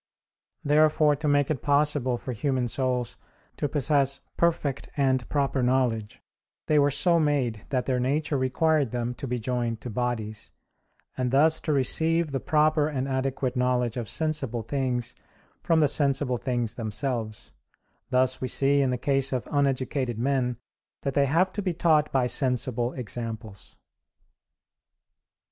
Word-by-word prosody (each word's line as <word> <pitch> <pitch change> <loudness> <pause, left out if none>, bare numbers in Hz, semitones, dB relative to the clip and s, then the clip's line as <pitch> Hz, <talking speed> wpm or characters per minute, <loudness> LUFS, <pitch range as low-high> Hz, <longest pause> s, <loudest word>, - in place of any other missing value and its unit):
Therefore 150 0 +4
to 150 +2 -3
make 145 0 +2
it 135 - -2
possible 145 -3 +1
for 130 - -6
human 130 +1 -1
souls 125 0 -2 0.4
to 145 - -1
possess 140 -1 +1 0.2
perfect 155 -5 0
and 130 -3 +1
proper 140 -2 0
knowledge, 125 -4 0 0.4
they 150 -1 +3
were 145 0 +4
so 170 +4 +3
made 135 -9 0
that 130 -2 -1
their 130 -2 0
nature 145 +4 0
required 140 +2 +1
them 120 +1 -3
to 135 - -7
be 125 0 -2
joined 120 -1 -2
to 120 - -6
bodies, 110 -3 -3 0.7
and 125 -1 -1
thus 155 +5 +3
to 155 - -2
receive 160 +3 +2
the 135 - -1
proper 155 0 +2
and 135 -3 -2
adequate 130 -1 -2
knowledge 125 -2 0
of 120 -4 -4
sensible 145 -7 -2
things 125 -1 -2 0.5
from 165 -1 +2
the 150 - +5
sensible 140 -3 +1
things 120 -2 -2
themselves; 115 -1 -4 0.6
thus 130 0 +1
we 130 - -1
see 140 +3 +2
in 135 - +1
the 125 - -1
case 135 +1 0
of 130 -3 -2
uneducated 135 -3 0
men 125 -1 0 0.5
that 140 - -1
they 140 0 +3
have 175 +7 +2
to 205 - -3
be 185 -3 -1
taught 155 -3 +2
by 130 -2 +2
sensible 125 -2 0
examples. 115 -4 -6
130 Hz, 150 wpm, -26 LUFS, 125-145 Hz, 0.7 s, the